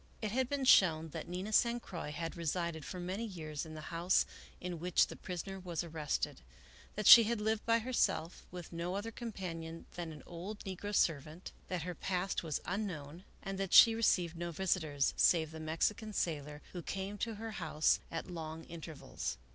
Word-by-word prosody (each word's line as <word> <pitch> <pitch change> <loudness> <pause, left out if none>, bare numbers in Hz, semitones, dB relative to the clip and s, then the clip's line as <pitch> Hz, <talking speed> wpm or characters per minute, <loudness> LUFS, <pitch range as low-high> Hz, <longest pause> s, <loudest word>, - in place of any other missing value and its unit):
It 215 -2 -2
had 255 +2 0
been 280 -2 -1
shown 165 -9 +6
that - - -6
Nina 185 +5 -4
San 235 +2 +4
Croix 170 -9 -6
had 165 +3 -4
resided 170 -1 -2
for 180 - -6
many 185 +5 -3
years 160 -8 -5
in 155 - -9
the 155 +2 -8
house 170 +2 +3 0.3
in 180 -2 -5
which 180 +1 +3
the - - -9
prisoner 190 +2 -5
was 175 -3 -3
arrested; 155 - -2 0.5
that 210 - -3
she 230 +3 +12
had 230 0 0
lived 220 0 0
by 230 0 +5
herself, 230 -8 0
with 180 -1 -9
no 170 +2 -2
other 210 +3 -3
companion 170 -8 -6
than 170 -2 -5
an 150 - -10
old 185 +5 -7
negro 200 +2 -4
servant; 160 +2 0 0.2
that 180 -4 -2
her 180 +1 -4
past 185 +2 -1
was 160 -4 -2
unknown, 175 -4 -4 0.2
and 195 0 -4
that 195 -2 +1
she 225 - +10
received 180 -7 +2
no 175 +1 -3
visitors, 160 -5 0
save 160 -3 +4
the 160 - -8
Mexican 195 +7 -1
sailor, 150 -5 -2
who 175 - -5
came 195 +4 -4
to 230 -2 -2
her 225 +2 -6
house 155 -6 +2
at - - -4
long 165 -2 -6
intervals. 160 - -6
175 Hz, 185 wpm, -34 LUFS, 160-205 Hz, 0.5 s, she